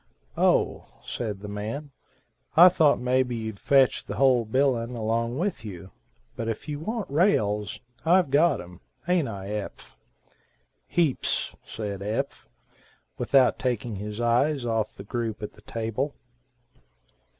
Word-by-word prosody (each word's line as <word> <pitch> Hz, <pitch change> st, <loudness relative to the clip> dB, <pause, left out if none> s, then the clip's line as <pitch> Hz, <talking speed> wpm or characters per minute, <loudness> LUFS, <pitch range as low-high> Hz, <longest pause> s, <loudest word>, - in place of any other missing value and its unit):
"O," -, -, +2 dB, 0.2 s
said 105 Hz, -5 st, -4 dB
the 105 Hz, -, -7 dB
man, 110 Hz, +9 st, -5 dB, 0.7 s
"I 175 Hz, +2 st, +11 dB
thought 155 Hz, -5 st, +3 dB
maybe 125 Hz, 0 st, +1 dB
you'd 110 Hz, -3 st, -5 dB
fetch 135 Hz, -2 st, +3 dB
the 100 Hz, -, -6 dB
whole 125 Hz, -1 st, +4 dB
bilin 125 Hz, 0 st, +1 dB
along 115 Hz, +2 st, -1 dB
with 180 Hz, -, -2 dB
you. 95 Hz, -3 st, -8 dB, 0.4 s
But 115 Hz, -, -4 dB
if 115 Hz, +5 st, -4 dB
you 145 Hz, -1 st, -4 dB
want 220 Hz, +5 st, -3 dB
rails, 110 Hz, -, +1 dB, 0.2 s
I've 170 Hz, -2 st, +4 dB
got 150 Hz, +1 st, +4 dB
em, 90 Hz, 0 st, -13 dB, 0.2 s
haint 175 Hz, -3 st, +2 dB
I 100 Hz, -3 st, -6 dB
Eph." 105 Hz, -1 st, -6 dB, 0.9 s
"Heaps," 160 Hz, -7 st, 0 dB
said 100 Hz, -3 st, -5 dB
Eph, 110 Hz, +7 st, -3 dB, 0.7 s
without 135 Hz, -2 st, +4 dB
taking 120 Hz, -4 st, -2 dB
his 105 Hz, +2 st, -6 dB
eyes 120 Hz, +4 st, +2 dB
off 115 Hz, -2 st, -1 dB
the 100 Hz, -, -9 dB
group 110 Hz, 0 st, -3 dB
at 105 Hz, -, -5 dB
the 105 Hz, -, -18 dB
table. 115 Hz, +6 st, -3 dB
120 Hz, 135 wpm, -26 LUFS, 105-140 Hz, 0.9 s, I